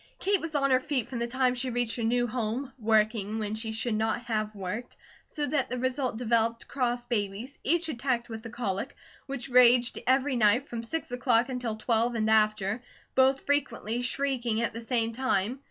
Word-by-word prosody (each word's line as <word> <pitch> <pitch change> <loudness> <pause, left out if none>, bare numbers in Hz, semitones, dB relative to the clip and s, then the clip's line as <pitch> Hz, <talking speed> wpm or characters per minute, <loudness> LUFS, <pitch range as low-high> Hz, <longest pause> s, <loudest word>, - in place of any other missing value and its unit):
Kate 400 -1 +1
was 320 -1 -5
on 275 -1 +2
her 255 - +5
feet 255 -3 -1
from 245 - -5
the 235 - -1
time 255 +1 +1
she 255 +1 -3
reached 245 -1 0
her 235 - -3
new 245 +2 +2
home, 245 +3 -3
working 215 -1 +1
when 215 -1 -2
she 220 0 -3
should 220 +1 -1
not 220 +2 0
have 215 -2 -2
worked; 205 +5 -5 0.3
so 295 - -3
that 290 -3 0
the 250 - -3
result 255 -1 -1
developed 230 -1 +1
cross 245 -2 -1
babies, 225 +3 -3
each 335 +3 +1
attacked 240 -4 -1
with 225 -1 -7
the 230 - -8
colic, 230 0 -3 0.3
which 275 -2 -5
raged 245 -1 +5
every 265 +1 +3
night 235 +4 +3
from 235 -1 -5
six 260 +4 -4
o'clock 245 0 +2
until 250 -4 -3
twelve 230 +2 +1
and 220 -1 +1
after, 215 0 +2 0.3
both 265 +1 +4
frequently 260 -5 -1
shrieking 245 -3 0
at 235 - -1
the 230 - -6
same 230 -1 0
time. 250 -1 0
240 Hz, 190 wpm, -28 LUFS, 220-260 Hz, 0.3 s, her